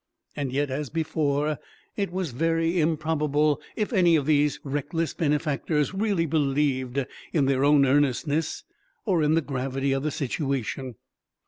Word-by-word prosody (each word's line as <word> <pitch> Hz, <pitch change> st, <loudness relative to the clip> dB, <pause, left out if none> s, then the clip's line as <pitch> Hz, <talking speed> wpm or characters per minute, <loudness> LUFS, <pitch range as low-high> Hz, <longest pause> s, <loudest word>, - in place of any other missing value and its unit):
And 140 Hz, -3 st, -3 dB
yet, 140 Hz, +1 st, 0 dB
as 140 Hz, 0 st, -3 dB
before, 150 Hz, -2 st, 0 dB, 0.4 s
it 200 Hz, -4 st, -2 dB
was 180 Hz, -4 st, -2 dB
very 165 Hz, +5 st, +1 dB
improbable 150 Hz, -2 st, +1 dB
if 215 Hz, +3 st, -2 dB
any 175 Hz, -5 st, +5 dB
of 145 Hz, -4 st, +1 dB
these 150 Hz, -1 st, +2 dB
reckless 145 Hz, +4 st, -2 dB
benefactors 150 Hz, 0 st, 0 dB
really 195 Hz, -4 st, +1 dB
believed 140 Hz, -3 st, 0 dB, 0.3 s
in 150 Hz, -5 st, +3 dB
their 135 Hz, 0 st, +2 dB
own 145 Hz, -1 st, +5 dB
earnestness 145 Hz, +3 st, +1 dB, 0.4 s
or 185 Hz, -7 st, +2 dB
in 150 Hz, +1 st, +3 dB
the 165 Hz, -, +3 dB
gravity 135 Hz, -1 st, -2 dB
of 135 Hz, 0 st, 0 dB
the 155 Hz, -, -1 dB
situation. 135 Hz, -3 st, -3 dB
150 Hz, 140 wpm, -26 LUFS, 140-160 Hz, 0.4 s, any